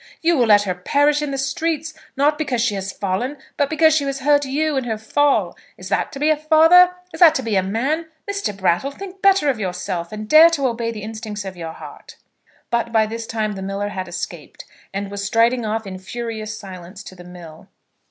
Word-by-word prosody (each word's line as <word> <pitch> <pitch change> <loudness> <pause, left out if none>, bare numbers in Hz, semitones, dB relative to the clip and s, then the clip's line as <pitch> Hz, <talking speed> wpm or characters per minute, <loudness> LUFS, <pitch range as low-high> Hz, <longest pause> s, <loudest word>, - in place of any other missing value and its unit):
You 340 +1 +3
will 245 -5 +2
let 205 -1 +6
her 190 -3 -1
perish 290 +11 +1
in 295 - -2
the 275 - -3
streets, 310 +3 -2 0.2
not 295 +2 +2
because 265 -6 -1
she 230 -2 +1
has 195 0 -4
fallen, 210 +9 -3 0.2
but 285 -1 0
because 315 0 +4
she 300 - +1
has 275 -1 -3
hurt 290 +1 +3
you 295 +3 -1
in 265 -2 -1
her 220 -2 -2
fall! 285 +6 +1 0.2
Is - - -9
that - - 0
to 275 - -7
be 300 +2 +3
a - - +4
father? 325 +4 +5 0.2
Is - - -8
that 340 -4 +7
to 265 - -1
be 225 -3 -1
a 190 - +4
man? 265 - -1 0.2
Mr. 400 - -3
Brattle, 190 +7 +1
think 380 +5 -10
better 390 -5 +4
of 260 -5 +1
yourself, 180 -3 -4
and 215 0 -6
dare 315 +6 +8
to 295 -5 -1
obey 235 -2 -1
the 215 -3 -6
instincts 215 -1 -6
of 190 -1 -6
your 165 -2 -7
heart." - - -12 0.6
But 235 -1 0
by 220 -1 +3
this 225 +1 -6
time 220 -2 -2
the 195 -2 -6
miller 195 +1 -3
had 185 -2 -5
escaped, 175 - -7 0.3
and 200 0 -4
was 200 0 -4
striding 230 +3 +2
off 220 +1 -2
in 185 -1 -7
furious 220 +1 -6
silence 190 -1 -10
to - - -11
the 180 -1 -13
mill. 175 -3 -12
230 Hz, 220 wpm, -20 LUFS, 200-295 Hz, 0.6 s, dare